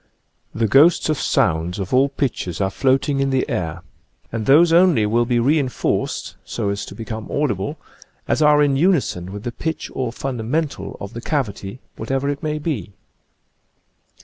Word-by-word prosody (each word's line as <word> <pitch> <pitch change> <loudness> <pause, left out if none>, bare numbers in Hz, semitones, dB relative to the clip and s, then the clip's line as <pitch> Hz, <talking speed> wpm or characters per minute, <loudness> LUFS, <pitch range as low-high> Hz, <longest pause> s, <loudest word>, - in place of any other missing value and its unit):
The 115 0 +1
ghosts 150 - +5
of 155 - 0
sounds 85 +2 +1
of 95 +1 -4
all 135 +2 +4
pitches 125 - -3
are 95 -1 0
float 130 +6 +1
ing 140 -2 0
in 135 0 +1
the 130 -1 0
air 85 0 -3 0.5
and 110 -2 -3
those 165 +4 +6
only 170 -10 +5
will 115 +3 +2
be 120 0 +1
re 140 +7 +3
en 135 -3 -1
forced, - - -2
so 100 - -3
as 100 0 -3
to - - -9
become 110 -1 -6
audible, 110 -10 -1 0.5
as - - +1
are 150 -1 +5
in 140 -2 +2
unison 135 - +1
with 105 +1 -7
the 120 - -3
pitch 160 +6 -4
or 125 -3 -2
fundamental 135 +5 -3
of 100 +3 -7
the 115 - -6
cavity, 120 -5 -3 0.2
whatever 135 +1 -1
it 145 0 -3
may 155 0 -2
be. 140 - -4
130 Hz, 175 wpm, -21 LUFS, 105-145 Hz, 0.5 s, those